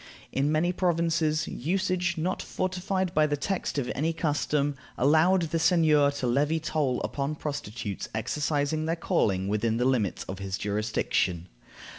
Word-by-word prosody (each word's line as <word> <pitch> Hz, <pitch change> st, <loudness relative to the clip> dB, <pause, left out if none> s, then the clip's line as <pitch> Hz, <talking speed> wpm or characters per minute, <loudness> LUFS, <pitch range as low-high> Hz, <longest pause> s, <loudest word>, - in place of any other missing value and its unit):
In 140 Hz, +3 st, +1 dB
many 170 Hz, +3 st, +2 dB
provinces, 165 Hz, -3 st, +1 dB
usage, 180 Hz, +3 st, -1 dB
not 180 Hz, +4 st, -1 dB
fortified 185 Hz, 0 st, -2 dB
by 155 Hz, -2 st, +4 dB
the 145 Hz, -1 st, -1 dB
text 190 Hz, 0 st, -2 dB
of 130 Hz, -3 st, -1 dB
any 160 Hz, +4 st, 0 dB
custom, 145 Hz, -2 st, 0 dB, 0.2 s
allowed 160 Hz, +7 st, +4 dB
the 165 Hz, -, +1 dB
seigneur 155 Hz, -4 st, +4 dB
to 140 Hz, -2 st, -3 dB
levy 145 Hz, +6 st, +2 dB
toll 150 Hz, -5 st, 0 dB
upon 140 Hz, +2 st, -2 dB
prostitutes 115 Hz, -9 st, -5 dB
exercising 145 Hz, +6 st, -1 dB
their 165 Hz, -, +1 dB
calling 95 Hz, -, 0 dB
within 110 Hz, +2 st, 0 dB
the 125 Hz, -, +1 dB
limits 120 Hz, -7 st, +1 dB
of 95 Hz, 0 st, -7 dB
his 95 Hz, -1 st, -3 dB
jurisdiction. 100 Hz, -4 st, -1 dB
150 Hz, 145 wpm, -27 LUFS, 125-165 Hz, 0.2 s, by